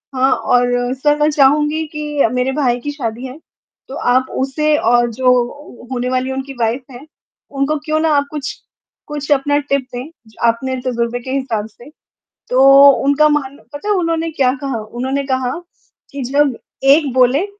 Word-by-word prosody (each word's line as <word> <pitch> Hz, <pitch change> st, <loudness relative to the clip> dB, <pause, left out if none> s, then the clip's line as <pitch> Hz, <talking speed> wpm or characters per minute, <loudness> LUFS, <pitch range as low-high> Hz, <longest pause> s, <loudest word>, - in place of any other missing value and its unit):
हाँ, 260 Hz, +1 st, +2 dB
और 245 Hz, 0 st, +1 dB
सर 295 Hz, +2 st, +1 dB
मैं 300 Hz, +1 st, +3 dB
चाहूँगी 295 Hz, +2 st, +2 dB
कि 300 Hz, -3 st, -1 dB
मेरे 250 Hz, +1 st, 0 dB
भाई 260 Hz, -4 st, 0 dB
की 290 Hz, +4 st, -5 dB
शादी 245 Hz, -3 st, -5 dB
है 260 Hz, +2 st, -8 dB, 0.5 s
तो 270 Hz, -, -8 dB, 0.2 s
आप 255 Hz, +1 st, +2 dB
उसे 300 Hz, +3 st, +1 dB
और 240 Hz, 0 st, +2 dB
जो 250 Hz, +1 st, -1 dB
होने 250 Hz, -1 st, -2 dB
वाली 255 Hz, +1 st, -1 dB
उनकी 270 Hz, +1 st, -5 dB
वाइफ 235 Hz, +3 st, 0 dB
हैं, 250 Hz, +3 st, -11 dB, 0.4 s
उनको 275 Hz, +2 st, -1 dB
क्यों 310 Hz, 0 st, 0 dB
ना 320 Hz, -, +1 dB
आप 285 Hz, -, 0 dB
कुछ, 290 Hz, -3 st, -4 dB, 0.5 s
कुछ 295 Hz, -1 st, -5 dB
अपना 285 Hz, +1 st, +2 dB
टिप 280 Hz, -1 st, -1 dB
दें 250 Hz, +5 st, -6 dB, 0.2 s
जो 220 Hz, -, -18 dB
आपने 260 Hz, +3 st, -1 dB
तजुर्बे 235 Hz, -1 st, -1 dB
के 260 Hz, +2 st, -7 dB
हिसाब 240 Hz, -6 st, -2 dB
से। 240 Hz, +5 st, -16 dB, 0.6 s
तो 255 Hz, +1 st, +3 dB, 0.4 s
उनका 290 Hz, +2 st, +4 dB
मान 285 Hz, -2 st, -1 dB, 0.2 s
पता 290 Hz, +8 st, -7 dB
है -, -, +4 dB
उन्होंने 330 Hz, -2 st, -1 dB
क्या 265 Hz, -4 st, +2 dB
कहा 270 Hz, -5 st, -3 dB
उन्होंने 260 Hz, +5 st, -3 dB
कहा 260 Hz, -2 st, -1 dB, 0.6 s
कि 280 Hz, -2 st, -5 dB
जब 275 Hz, 0 st, +1 dB, 0.4 s
एक 295 Hz, -3 st, -1 dB
बोले 260 Hz, +7 st, +3 dB
265 Hz, 170 wpm, -17 LUFS, 245-290 Hz, 0.6 s, उनका